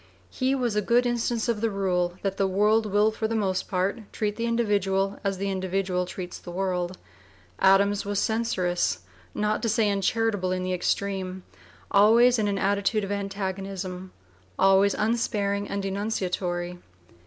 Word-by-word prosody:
He 260 +1 0
was 245 -5 -1
a 210 - +2
good 240 +4 +3
instance 240 -1 0
of 230 -3 -1
the 230 - +2
rule 180 -3 0
that 195 -1 -1
the 195 - +2
world 210 +3 +2
will 210 +2 +3
for 220 0 -2
the 225 - -2
most 190 -4 0
part 190 +4 -1
treat 210 -1 -2
the 230 +1 -2
individual 200 -4 0
as 195 -1 -1
the 200 +1 -2
individual 185 -1 -1
treats 180 -1 -7
the - - -11
world. 180 0 -2 0.6
Adams 200 +1 +4
was 205 0 -3
censorious, 180 - 0 0.3
not 210 0 0
to 230 - 0
say 220 -1 +2
uncharitable 200 -1 0
in 185 0 -1
the 185 0 -1
extreme, 190 0 -2
(p. - - -26
vii) - - -23 0.2
always 230 +4 +5
in 210 - +1
an 200 -1 0
attitude 200 +2 +1
of 195 - -4
antagonism, 195 -2 -4 0.5
always 195 +1 +4
unsparing 205 -2 0
and 200 0 -3
denunciatory. 180 -3 -2
200 Hz, 165 wpm, -26 LUFS, 185-215 Hz, 0.6 s, always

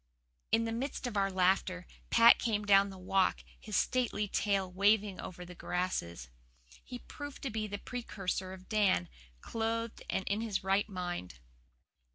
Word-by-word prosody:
'" - - -47
In 225 0 +3
the 225 - -2
midst 255 +4 -3
of 245 -3 -3
our 195 -1 +2
laughter 185 -1 +1 0.2
Pat 230 0 +7
came 210 -3 0
down 200 0 +5
the 190 - -9
Walk, 185 +1 +1 0.2
his 215 -2 -5
stately 240 -4 +1
tail 195 -2 0
waving 200 +1 +2
over 180 0 -8
the 180 - -10
grasses. 170 - -3 0.6
He 250 - -7
proved 290 -1 -8
to 270 - -2
be 215 0 -2
the 205 0 -4
precursor 195 -5 -4
of 185 0 -11
Dan, 200 - +2 0.3
clothed 230 0 -2
and 190 - 0
in 205 +2 -1
his 215 -4 -2
right 195 +3 +1
mind. 175 - -5
200 Hz, 165 wpm, -32 LUFS, 185-225 Hz, 0.6 s, Pat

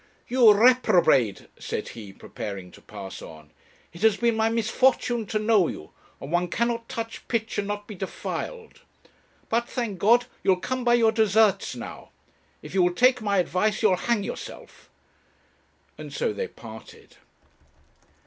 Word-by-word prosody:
'You 240 -3 +6
reprobate!' 200 - +4
said - - -4
he, 105 -4 -10
preparing 95 -1 -8
to - - -16
pass 100 -2 -9
on; 80 -2 -12 0.4
'it 170 - -12
has 220 -2 +4
been 235 -1 +1
my 220 0 +2
misfortune 230 0 +1
to 215 - -1
know 210 -4 +3
you, 75 - -8 0.3
and 140 - -8
one 175 +1 +1
cannot 235 +4 -2
touch 230 0 -6
pitch 225 -3 -2
and 200 - -2
not 205 0 -4
be 215 - -9
defiled. 450 - -6 0.7
But, 235 +1 -1
thank 225 -7 -3
God, 235 +6 +4 0.2
you'll 190 - +3
come 255 +7 -4
by 240 0 +4
your 225 -2 +4
deserts 220 -1 +2
now. - - -9 0.5
If - - -10
you 190 - +3
will 175 0 +2
take 250 +3 +4
my 200 -2 0
advice 185 +4 0
you'll 200 -4 +5
hang 230 +2 0
yourself;' - - -9 1.1
and - - -8
so 470 -3 -1
they 475 +1 -3
parted. - - -13
215 Hz, 155 wpm, -25 LUFS, 180-235 Hz, 1.1 s, You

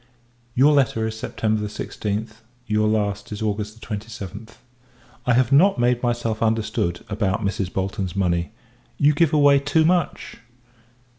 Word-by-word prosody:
Your 140 +4 +5
letter 125 -5 +2
is 110 0 -3
September 110 -1 -1
16th, 105 +1 -4 0.3
your 105 -1 +1
last 105 -1 -1
is 105 +1 -4
August 105 +1 -3
27th. 110 0 -7 0.7
I 125 - +4
have 125 +1 +2
not 180 +9 +5
made 120 0 +2
myself 120 -2 -1
understood, 110 -6 -1
about 105 0 -1
Mrs. 100 -2 -2
Bolton's 95 -1 -3
money. 85 -3 0 0.5
You 145 +3 +4
give 155 +1 +2
away 145 -2 +5
too 145 +3 +2
much. 175 +1 0
110 Hz, 135 wpm, -22 LUFS, 105-125 Hz, 0.7 s, Your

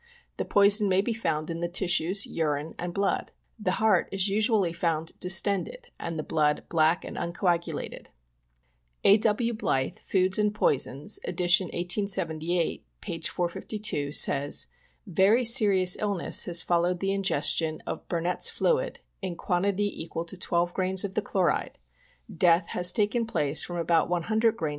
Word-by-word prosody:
The - - -3
poison 205 +1 +5
may 185 +1 +3
be 230 +3 -2
found 165 -7 -3
in 165 - -5
the 170 - -2
tissues, 180 +2 +2
urine 150 -1 -3
and 175 0 -4
blood." 195 +2 -2 0.2
" - - -42
The - - +1
heart 215 -5 +2
is 195 +1 0
usually 210 -3 +1
found 165 -1 -2
distended, 200 - +1
and 165 -1 -5
the 155 - -3
blood 150 -2 0
black 160 +1 +1
and - - -8
uncoagulated." 170 -2 -3 1.0
A. 200 - +6
W. 225 +2 0
Blyth, 135 - -2
Foods 190 +1 0
and 210 0 0
Poisons, 145 +1 0
ed. - - -5
1878, 175 -1 +1 0.2
p. 165 - -6
452, 175 -2 -2
says: 145 -1 +2 0.2
" - - -40
Yery 200 +7 +2
serious 200 -6 +5
illness 200 -4 0
has 170 -1 +2
followed 175 +1 0
the 195 +1 -1
ingestion 160 -4 0
of - - -6
Bur 170 -2 -2
nett's 180 +2 +1
fluid, - - -1 0.2
in 185 -3 -4
quantity 200 +3 -2
equal 165 0 -6
to 170 - -4
12 175 -1 -1
grains 185 0 0
of 200 -2 -5
the 215 - -1
chloride^ 185 -6 -1 0.6
Death 170 0 +3
has 180 0 +2
taken 220 +4 0
place 150 -7 0
from 175 - -4
about 165 -1 +1
100 220 +6 0
grs. 155 - -2
180 Hz, 155 wpm, -26 LUFS, 165-200 Hz, 1.0 s, A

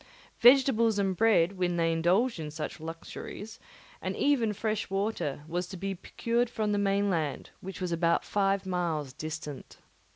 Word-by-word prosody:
Vegetables 240 -3 +6
and 195 -2 +1
bread, 195 -3 +3
when 175 -1 +1
they 165 -1 +2
indulged 180 +7 +2
in 155 -1 -4
such 155 +2 -5
luxuries, 165 +6 -8 0.4
and - - -3
even 255 -7 +2
fresh 215 +1 -2
water, 195 -8 -2
was 175 +2 -2
to 190 - -8
be 195 +2 -3
procured 230 +5 -1
from 215 -3 -1
the 205 - +1
mainland, 195 -7 0
which 190 +1 -8
was 180 -2 -2
about 170 0 +2
five 195 -1 +1
miles 165 -7 -2
distant. 150 -1 -7
190 Hz, 155 wpm, -29 LUFS, 165-215 Hz, 0.4 s, Vegetables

